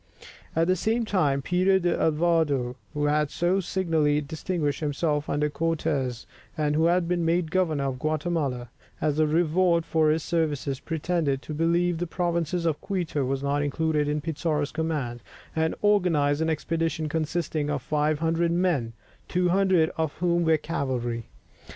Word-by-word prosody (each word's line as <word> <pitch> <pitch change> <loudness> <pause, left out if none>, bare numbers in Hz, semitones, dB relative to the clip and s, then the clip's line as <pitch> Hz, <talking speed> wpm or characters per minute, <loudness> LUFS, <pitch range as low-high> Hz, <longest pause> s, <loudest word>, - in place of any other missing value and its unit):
At 165 +1 +3
the 185 +2 +2
same 225 +6 0
time, 145 -10 +1
Peter 185 +4 +3
d'Alvarado, 160 -7 +1 0.2
who 150 0 0
had 150 0 +2
so 175 +5 +1
signally 165 -5 +1
distinguished 150 0 -2
himself 150 0 -1
under 150 +1 +1
Cortès, 145 -5 -1 0.3
and 150 -1 +1
who 160 +1 +3
had 175 0 +2
been 175 -1 0
made 165 -1 +1
governor 165 -6 +1
of 135 -2 -2
Guatemala, 155 -6 -1 0.3
as 155 0 0
a 155 - +4
reward 170 +2 +2
for 160 -2 +2
his 155 0 +1
services, 150 -5 -1
pretended 160 -4 -1
to 155 - -6
believe 170 +2 +1
that 175 - -1
the - - -20
province 170 -3 0
of 160 -3 0
Quito 175 -7 -2
was 135 +1 -2
not 140 +1 +1
included 150 +1 0
in 150 0 -1
Pizarro's 155 -2 -1
command, 150 -7 -2 0.3
and 160 0 +1
organized 165 -8 +3
an 160 - +1
expedition 160 0 -1
consisting 155 -1 -2
of 145 -3 -2
500 155 +3 +1
men, 170 -10 0 0.3
200 180 -1 +2
of 160 -2 0
whom 175 0 +1
were 160 -1 +4
cavalry. 130 -7 -3
160 Hz, 150 wpm, -26 LUFS, 145-170 Hz, 0.3 s, a